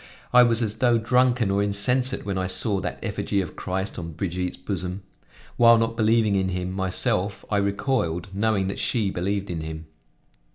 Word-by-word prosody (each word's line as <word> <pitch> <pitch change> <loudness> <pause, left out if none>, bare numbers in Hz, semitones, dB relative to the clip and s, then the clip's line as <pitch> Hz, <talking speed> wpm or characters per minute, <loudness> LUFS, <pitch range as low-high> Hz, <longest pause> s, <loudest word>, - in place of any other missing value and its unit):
I 125 - +8
was 120 -1 +3
as 110 0 -3
though 120 0 +3
drunken 120 -1 +2
or 100 +1 +1
insensate 125 +6 +1
when 100 -1 -2
I 95 0 -1
saw 100 +1 +1
that - - -4
effigy 100 - -1
of 95 - -4
Christ 95 +1 -4
on 85 -1 -7
Brigitte's 90 +1 -3
bosom; 95 0 -5 0.5
while 115 -1 +7
not 115 0 0
believing 110 -1 +2
in 95 -1 +1
him 90 0 -3
myself 95 +2 0
I 105 - +2
recoiled, 100 -4 -1
knowing 100 -1 +1
that 100 - -4
she 110 -6 +1
believed 100 +2 -2
in 85 -2 -4
him. 80 0 -7
100 Hz, 175 wpm, -24 LUFS, 95-115 Hz, 0.5 s, I